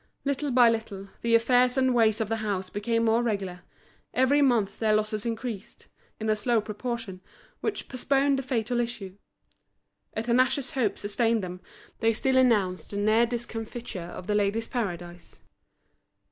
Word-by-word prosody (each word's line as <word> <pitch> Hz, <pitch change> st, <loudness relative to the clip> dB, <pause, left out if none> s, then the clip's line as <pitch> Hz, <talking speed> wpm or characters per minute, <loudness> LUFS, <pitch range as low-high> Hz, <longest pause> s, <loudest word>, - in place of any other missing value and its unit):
Little 280 Hz, +1 st, -1 dB
by 245 Hz, -2 st, +6 dB
little 215 Hz, -4 st, -2 dB
the 230 Hz, 0 st, +3 dB
affairs 245 Hz, +2 st, +3 dB
and 260 Hz, -1 st, +3 dB
ways 225 Hz, -2 st, +3 dB
of 220 Hz, -, 0 dB
the 225 Hz, +1 st, -1 dB
house 200 Hz, -4 st, -3 dB
became 230 Hz, +3 st, 0 dB
more 225 Hz, +1 st, +3 dB
regular; 195 Hz, -6 st, -2 dB, 0.5 s
every 265 Hz, +3 st, +4 dB
month 230 Hz, -8 st, +2 dB
their 215 Hz, -1 st, +3 dB
losses 215 Hz, +1 st, -1 dB
increased, 225 Hz, -3 st, -5 dB, 0.3 s
in 220 Hz, -, -3 dB
a 215 Hz, -, +3 dB
slow 230 Hz, +2 st, +1 dB
proportion 215 Hz, -2 st, -5 dB, 0.4 s
which -, -, -3 dB
postponed 275 Hz, +1 st, +1 dB
the -, -, -1 dB
fatal 245 Hz, -2 st, -1 dB
issue. 220 Hz, -6 st, -4 dB, 1.0 s
A 220 Hz, -, -1 dB
tenacious 255 Hz, +3 st, +1 dB
hope 240 Hz, -6 st, 0 dB
sustained 225 Hz, +1 st, 0 dB
them, 180 Hz, 0 st, -6 dB, 0.4 s
they 225 Hz, 0 st, +3 dB
still 265 Hz, +4 st, 0 dB
announced 210 Hz, -8 st, +2 dB
the 200 Hz, -, -5 dB
near 215 Hz, +3 st, +3 dB
discomfiture 230 Hz, -3 st, -5 dB, 0.2 s
of 185 Hz, -, -8 dB
The 210 Hz, -, -1 dB
Ladies' 210 Hz, +2 st, +1 dB
Paradise. 175 Hz, -7 st, -5 dB
225 Hz, 155 wpm, -27 LUFS, 205-245 Hz, 1.0 s, by